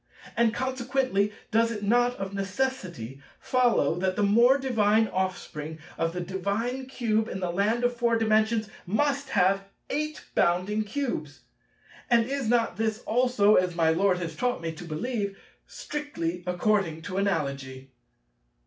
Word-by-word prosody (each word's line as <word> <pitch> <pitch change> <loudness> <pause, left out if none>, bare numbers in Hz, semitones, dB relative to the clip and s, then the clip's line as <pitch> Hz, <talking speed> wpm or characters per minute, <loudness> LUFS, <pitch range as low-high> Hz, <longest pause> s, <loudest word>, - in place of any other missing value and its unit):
And 235 -1 +3
consequently 255 -4 0 0.2
does 230 +1 +3
it 210 -2 -5
not 245 +4 +3
of 195 -2 -5
necessity 195 - -3 0.2
follow 250 -7 +2
that 185 0 0
the 210 - +1
more 235 +6 +5
divine 225 -5 +2
offspring 160 -4 -3 0.2
of 165 +1 0
the 180 - -3
divine 200 +8 -2
Cube 225 -4 0
in 190 - -4
the 180 -2 -2
Land 210 +6 +1
of 245 0 +1
Four 235 -1 +2
Dimensions, 220 0 +2 0.2
must 280 +7 0
have 195 +2 +2 0.3
8 305 +1 -3
bounding 185 +5 +2
Cubes: 200 - -4 0.7
and 235 -1 +4
is 270 -2 -2
not 235 -1 +2
this 220 -1 -1
also, 230 -3 +4
as 180 -1 +1
my 165 -2 +3
Lord 185 +2 +2
has 165 -3 -5
taught 245 +7 0
me 165 -1 -3
to 160 - -10
believe, 200 +5 -3 0.3
"strictly 180 - -4
according 180 -3 0
to 185 +2 -5
Analogy"? 140 -8 -2
210 Hz, 145 wpm, -27 LUFS, 180-245 Hz, 0.7 s, more